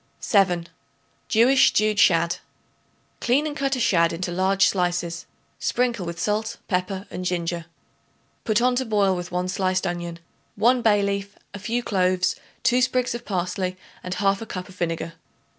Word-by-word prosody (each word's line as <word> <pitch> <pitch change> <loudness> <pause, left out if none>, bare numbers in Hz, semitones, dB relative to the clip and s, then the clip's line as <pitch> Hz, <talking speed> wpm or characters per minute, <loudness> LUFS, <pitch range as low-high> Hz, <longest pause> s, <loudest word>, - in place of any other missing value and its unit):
7. 180 -5 +2 0.6
Jewish 255 +4 +5
Stewed 215 0 +2
Shad. 170 -3 +4 0.8
Clean 265 +5 +2
and 300 -1 -3
cut 275 -1 0
a - - -3
shad 170 -7 +3
into 175 +1 -3
large 190 +2 +3
slices; 175 -2 -1 0.3
sprinkle 235 -7 0
with 170 0 -5
salt, 215 +1 -1
pepper 190 0 -2
and 180 - -5
ginger. 170 -2 -2 0.8
Put 215 +1 +2
on 250 0 +3
to 260 - 0
boil 205 -4 +2
with 175 0 -6
1 180 +1 -1
sliced 185 0 0
onion, 175 -1 -3 0.4
1 240 +4 +3
bay 210 -3 +3
leaf, 200 0 -3 0.2
a 200 - -6
few 235 +4 -2
cloves, 185 -3 +1 0.3
2 250 +1 +3
sprigs 255 -1 +1
of 235 - -6
parsley 185 -1 -2 0.3
and 180 0 -4
1/2 195 +3 0
cup 185 -1 -5
of 185 - -13
vinegar. 165 -1 -3
195 Hz, 160 wpm, -24 LUFS, 180-220 Hz, 0.8 s, Jewish